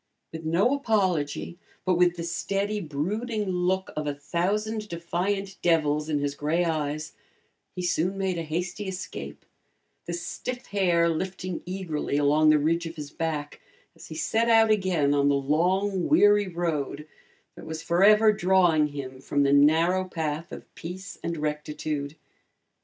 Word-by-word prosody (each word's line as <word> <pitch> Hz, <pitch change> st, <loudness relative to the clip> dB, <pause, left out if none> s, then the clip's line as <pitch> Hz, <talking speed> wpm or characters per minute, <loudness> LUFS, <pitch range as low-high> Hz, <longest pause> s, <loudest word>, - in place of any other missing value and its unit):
With 160 Hz, 0 st, -7 dB
no 185 Hz, +11 st, +3 dB
apology 185 Hz, -, 0 dB, 0.3 s
but 185 Hz, -, +3 dB
with 175 Hz, 0 st, +3 dB
the 170 Hz, -, -5 dB
steady, 200 Hz, +5 st, -2 dB
brooding 205 Hz, +8 st, -2 dB
look 185 Hz, +1 st, 0 dB
of 150 Hz, -1 st, -3 dB
a 145 Hz, -, -2 dB
thousand 210 Hz, +8 st, -2 dB
defiant 185 Hz, +4 st, -2 dB
devils 150 Hz, -3 st, +2 dB
in 150 Hz, -, +1 dB
his 145 Hz, 0 st, -1 dB
gray 155 Hz, +5 st, 0 dB
eyes, 155 Hz, -1 st, -2 dB, 0.6 s
he 180 Hz, -, -4 dB
soon 180 Hz, +2 st, 0 dB
made 190 Hz, -3 st, -1 dB
a -, -, -1 dB
hasty 180 Hz, +5 st, -3 dB
escape, 175 Hz, -, -7 dB, 0.6 s
the 170 Hz, -, -3 dB
stiff 245 Hz, +8 st, -5 dB
hair 175 Hz, -4 st, +2 dB
lifting 185 Hz, +1 st, -3 dB
eagerly 175 Hz, -6 st, -2 dB
along 150 Hz, +2 st, +4 dB
the 155 Hz, -, +6 dB
ridge 165 Hz, +3 st, 0 dB
of 165 Hz, -, -8 dB
his 150 Hz, -2 st, -7 dB
back 155 Hz, -3 st, -4 dB, 0.3 s
as -, -, -13 dB
he 160 Hz, -, -8 dB
set 225 Hz, +8 st, +1 dB
out 225 Hz, -1 st, +5 dB
again 180 Hz, -9 st, +2 dB
on 140 Hz, 0 st, +3 dB
the 140 Hz, -, +3 dB
long 180 Hz, +7 st, +1 dB
weary 205 Hz, -9 st, +5 dB
road 155 Hz, -4 st, -3 dB, 0.5 s
that -, -, -12 dB
was 160 Hz, +1 st, -5 dB
forever 210 Hz, +6 st, +5 dB
drawing 175 Hz, -5 st, +3 dB
him 135 Hz, -3 st, -7 dB
from 145 Hz, +1 st, +1 dB
the 140 Hz, 0 st, +3 dB
narrow 165 Hz, +6 st, +4 dB
path 160 Hz, -2 st, -4 dB
of -, -, -10 dB
peace 185 Hz, +3 st, -8 dB
and 170 Hz, 0 st, -2 dB
rectitude. 150 Hz, -1 st, -3 dB
170 Hz, 150 wpm, -26 LUFS, 150-190 Hz, 0.6 s, the